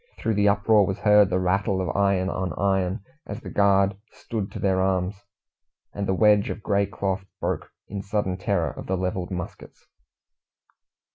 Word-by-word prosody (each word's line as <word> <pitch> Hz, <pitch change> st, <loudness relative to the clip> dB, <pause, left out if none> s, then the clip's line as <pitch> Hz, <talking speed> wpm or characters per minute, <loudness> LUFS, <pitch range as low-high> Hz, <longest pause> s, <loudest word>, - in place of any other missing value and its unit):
Through 110 Hz, -, -1 dB
the 105 Hz, 0 st, +3 dB
uproar 100 Hz, 0 st, +4 dB
was 95 Hz, -, -2 dB
heard 105 Hz, -2 st, +5 dB
the 90 Hz, -, +1 dB
rattle 95 Hz, +2 st, +1 dB
of 95 Hz, -, -2 dB
iron 100 Hz, -2 st, +2 dB
on 95 Hz, -3 st, -2 dB
iron, 95 Hz, 0 st, 0 dB, 0.2 s
as 100 Hz, +2 st, -5 dB
the -, -, -9 dB
guard 100 Hz, -1 st, +3 dB, 0.2 s
"stood 105 Hz, -4 st, -5 dB
to -, -, -7 dB
their 95 Hz, -1 st, +1 dB
arms," 95 Hz, +1 st, -1 dB, 0.7 s
and 100 Hz, -1 st, -3 dB
the 95 Hz, -, +1 dB
wedge 105 Hz, 0 st, +4 dB
of 105 Hz, -, -5 dB
grey 100 Hz, -1 st, +1 dB
cloth 95 Hz, -1 st, -2 dB, 0.2 s
broke, -, -, -2 dB, 0.2 s
in 100 Hz, 0 st, -5 dB
sudden 100 Hz, -2 st, -1 dB
terror 95 Hz, -3 st, -1 dB
of -, -, -9 dB
the 95 Hz, -, 0 dB
levelled 90 Hz, 0 st, -2 dB
muskets. 90 Hz, -2 st, -8 dB
100 Hz, 170 wpm, -25 LUFS, 95-100 Hz, 0.7 s, heard